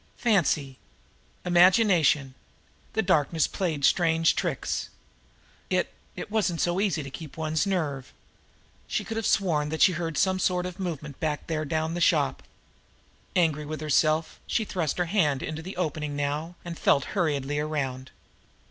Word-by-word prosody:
Fancy! 150 - +1 0.7
Imagination! 175 - +4 0.6
The 220 - +1
darkness 160 -3 +2
played 160 -7 -1
strange 165 -1 +3
tricks! - - -2 0.8
It - - 0 0.2
it - - -7
wasn't 185 -6 0
so 175 +1 +1
easy 180 -7 0
to 135 - -8
keep 155 +1 -9
one' 155 -1 -2
s 160 +6 +1
nerve. 150 -9 -2 0.8
She - - -1
could 225 - -5
have 225 -1 -1
sworn 155 -6 +1
that 160 +1 +2
she 190 - +6
had 170 - -4
heard 165 -4 -3
some 190 +3 +2
sort 180 -1 +1
of 180 +1 -6
movement 150 -6 -5
back 150 -2 -2
there 155 -1 -2
down 160 +1 -1
the 175 - -3
shop. - - +2 0.9
Angry 160 -4 +2
with 155 0 -4
herself, 155 +1 +1
she 220 - 0
thrust 170 -8 -2
her 175 - +1
hand 160 -8 +1
into 155 0 -4
the 185 +3 -8
opening 150 -4 -2
now 145 +4 -2
and 170 -1 -6
felt 140 - +3
hurriedly 145 -6 0
around. 135 -4 -3
160 Hz, 155 wpm, -27 LUFS, 150-180 Hz, 0.9 s, she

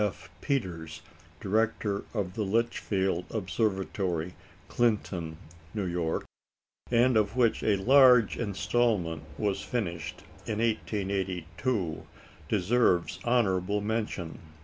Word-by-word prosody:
F. 105 -3 -4
Peters, 90 - -3 0.4
director 105 0 0
of 100 -5 -2
the 110 - -3
Litchfield 100 -4 0
Observatory, 95 -4 -1 0.3
Clinton 95 -9 0 0.4
(N.Y.), 85 -4 -1 0.7
and 120 +1 +4
of 105 0 +2
which 120 -3 +3
a 105 - +3
large 125 +1 +6
instalment 100 -5 0 0.2
was 100 -2 0
finished 85 -9 -4 0.2
in 110 - -2
1882, 95 -3 -2 0.4
deserves 100 -2 +2
honourable 105 -5 +2
mention. 105 -5 -3
100 Hz, 90 wpm, -29 LUFS, 90-115 Hz, 0.7 s, large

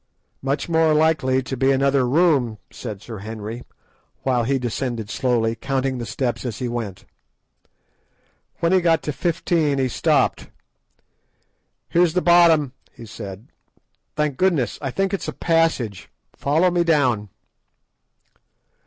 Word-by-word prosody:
"Much 135 +1 -2
more 160 -2 +3
likely 150 -4 +2
to 130 - -4
be 135 +2 +2
another 135 -1 +2
room," 140 -7 +2
said 105 -4 -7
Sir 115 -4 -8
Henry, 110 +2 -6 0.6
while 125 -3 +1
he 135 +2 +1
descended 120 -3 -3
slowly, 120 -4 +1
counting 135 +1 -2
the 120 - -5
steps 120 +1 -2
as 120 -5 -4
he 125 - -3
went. 110 -6 -5 1.6
When 170 0 +2
he 190 -1 +4
got 165 -2 +2
to 150 - -3
"fifteen" 165 -3 0
he 135 -1 +1
stopped. 120 - +1 1.4
"Here's 170 -1 +2
the 180 - +1
bottom," 170 -6 +5 0.2
he 115 - -12
said. 105 0 -9 0.7
"Thank 150 -3 -1
goodness! 170 -10 +1
I 135 - -2
think 195 +8 -1
it's 195 - -3
a - - -3
passage. 165 - 0 0.3
Follow 160 +6 +2
me 175 0 +2
down." 130 -11 +1
135 Hz, 135 wpm, -22 LUFS, 120-160 Hz, 1.6 s, bottom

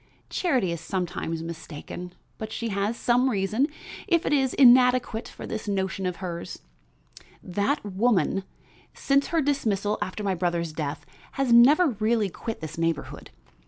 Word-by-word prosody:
Charity 255 - +1
is 170 -1 -4
sometimes 165 -2 -3
mistaken, 170 +2 -8 0.2
but 220 -1 -5
she 230 +1 -3
has 200 +3 -1
some 250 +2 +2
reason, 215 +5 +1 0.4
if 340 -2 +2
it - - +1
is 265 -3 +2
inadequate, 250 -3 +5
for - - -9
this 220 0 -5
notion 190 -1 -1
of 180 - -2
hers. 170 -2 -6 0.9
That 205 +9 -1
woman, 195 -1 +1 0.5
since 275 0 +2
her 330 -1 +1
dismissal 215 -7 0
after 205 +1 -4
my 195 -2 +1
brother's 170 -2 -1
death, 150 -1 -4 0.3
has 270 -3 +1
never 290 +8 +7
really 215 -2 0
quit 225 +6 -6
this 155 +1 -6
neighborhood. 165 -2 -2
205 Hz, 145 wpm, -26 LUFS, 180-250 Hz, 0.9 s, never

